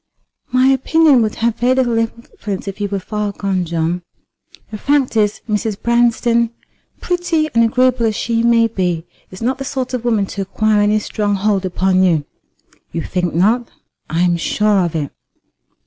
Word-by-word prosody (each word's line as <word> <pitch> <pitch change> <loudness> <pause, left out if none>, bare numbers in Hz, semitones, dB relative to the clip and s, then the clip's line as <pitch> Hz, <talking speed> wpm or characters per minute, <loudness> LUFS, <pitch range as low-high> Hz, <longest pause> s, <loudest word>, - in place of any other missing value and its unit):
"My 255 +1 +3
opinion 270 +1 +4
would 215 -1 -1
have 230 0 0
very 250 +2 +3
little 245 -3 +1
influence 225 -3 -5
if 195 +1 -6
you 205 - 0
were 200 - -1
far 210 +2 -3
gone, 195 -2 -2
John. 170 +1 -1 0.7
The 215 - -6
fact 280 -3 +1
is, 210 -2 +1
Mrs. 210 -1 -2
Branston, 235 0 +2 0.5
pretty 345 -3 0
and 230 - +4
agreeable 250 0 +2
as 215 - -1
she 230 +1 0
may 235 -1 +4
be, 180 -6 -2 0.2
is 185 +4 -9
not 260 +3 0
the - - -3
sort 260 -1 -4
of 250 -2 -2
woman 225 -4 +1
to 200 - -5
acquire 210 +2 +1
any 210 +1 +3
strong 205 -1 -1
hold 200 -1 0
upon 185 +1 +1
you." 165 -6 +2 0.7
"You 165 -1 -3
think 180 -3 -2
not?" 225 +7 +2 0.4
"I 165 +2 +1
am 175 -1 +2
sure 205 +3 +1
of 170 -2 -3
it." 145 -3 -2
215 Hz, 175 wpm, -17 LUFS, 190-240 Hz, 0.7 s, opinion